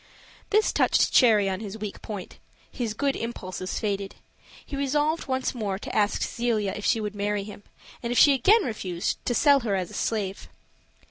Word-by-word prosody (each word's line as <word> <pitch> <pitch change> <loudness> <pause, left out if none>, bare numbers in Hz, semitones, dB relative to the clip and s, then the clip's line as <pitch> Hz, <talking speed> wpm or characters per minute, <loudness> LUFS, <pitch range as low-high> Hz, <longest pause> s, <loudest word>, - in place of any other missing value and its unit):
This 430 +1 +3
touched - - +3
Cherry 215 -6 +5
on 190 -1 -2
his 210 -1 -6
weak 210 -2 -6
point 200 -4 -7 0.3
his 230 -4 -3
good 280 +3 0
impulses 185 -5 -5
faded; 200 -2 -3 0.5
he 285 - -6
resolved 295 +3 0
once 260 -1 -1
more 205 -6 -3
to - - -7
ask 210 -1 +2
Zelia 225 -4 -1
if 210 - -7
she 225 - +3
would 210 -1 -3
marry 205 0 -1
him, 205 0 -10 0.4
and 235 - -3
if 245 - 0
she 285 - +7
again 395 - +4
refused, 185 - -3
to 245 - +1
sell 285 +1 +5
her 220 -6 -1
as 185 -2 -3
a - - -12
slave. 200 -4 -3
215 Hz, 185 wpm, -26 LUFS, 200-260 Hz, 0.5 s, she